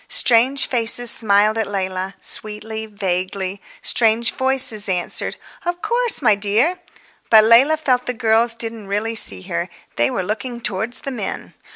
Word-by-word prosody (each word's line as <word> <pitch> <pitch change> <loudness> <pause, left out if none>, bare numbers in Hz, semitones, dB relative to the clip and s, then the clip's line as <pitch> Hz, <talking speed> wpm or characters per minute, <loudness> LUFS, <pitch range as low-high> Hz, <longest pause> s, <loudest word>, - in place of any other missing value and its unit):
Strange 265 - +3
faces 240 0 +2
smiled 215 0 +3
at 220 - -1
Leila—sweetly, 205 +3 -5
vaguely. 190 -1 -4 0.2
Strange 230 0 +2
voices 260 -6 +5
answered, 180 -2 -2 0.3
"Of 350 0 -4
course, 470 - 0
my 215 -4 +5
dear." 215 - 0 0.5
But 220 -1 +7
Leila 250 +8 +5
felt 255 -5 -1
the 250 - -1
girls 230 0 +1
didn't 225 -3 -5
really 210 +3 -2
see 95 - -1
her. 85 - -4 0.3
They 120 - +2
were 190 - -3
looking 235 +5 -5
towards 220 +2 -2
the 275 - -6
men. 225 -6 -6
220 Hz, 145 wpm, -18 LUFS, 200-245 Hz, 0.5 s, But